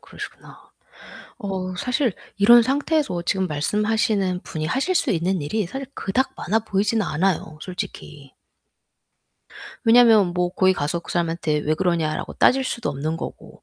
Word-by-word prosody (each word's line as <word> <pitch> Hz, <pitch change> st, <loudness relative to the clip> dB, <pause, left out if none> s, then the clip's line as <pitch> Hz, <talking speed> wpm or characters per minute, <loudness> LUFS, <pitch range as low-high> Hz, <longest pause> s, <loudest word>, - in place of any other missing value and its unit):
그러시구나. -, -, -11 dB, 0.7 s
어 185 Hz, -2 st, -4 dB
사실 250 Hz, +3 st, 0 dB, 0.2 s
이런 235 Hz, +4 st, +7 dB
상태에서 285 Hz, -, 0 dB
지금 190 Hz, +1 st, 0 dB
말씀하시는 205 Hz, -, 0 dB
분이 155 Hz, -1 st, -4 dB
하실 275 Hz, -, 0 dB
수 -, -, +2 dB
있는 180 Hz, +1 st, 0 dB
일이 200 Hz, +9 st, -1 dB
사실 270 Hz, +8 st, -6 dB
그닥 255 Hz, +7 st, -1 dB
많아 215 Hz, +5 st, 0 dB
보이진 210 Hz, +1 st, 0 dB
않아요 160 Hz, -2 st, -1 dB
솔직히. 150 Hz, -6 st, -8 dB, 1.5 s
왜냐하면 225 Hz, -4 st, +6 dB
뭐 180 Hz, 0 st, 0 dB
거기 185 Hz, +1 st, +3 dB
가서 155 Hz, 0 st, -2 dB
그 -, -, -8 dB
사람한테 165 Hz, -3 st, 0 dB
"왜 150 Hz, +1 st, 0 dB
그러냐?"라고 165 Hz, -2 st, -1 dB
따질 265 Hz, +1 st, +3 dB
수도 240 Hz, -2 st, -3 dB
없는 150 Hz, +4 st, -3 dB
거고 -, -, -9 dB
190 Hz, 320 characters per minute, -22 LUFS, 165-225 Hz, 1.5 s, 이런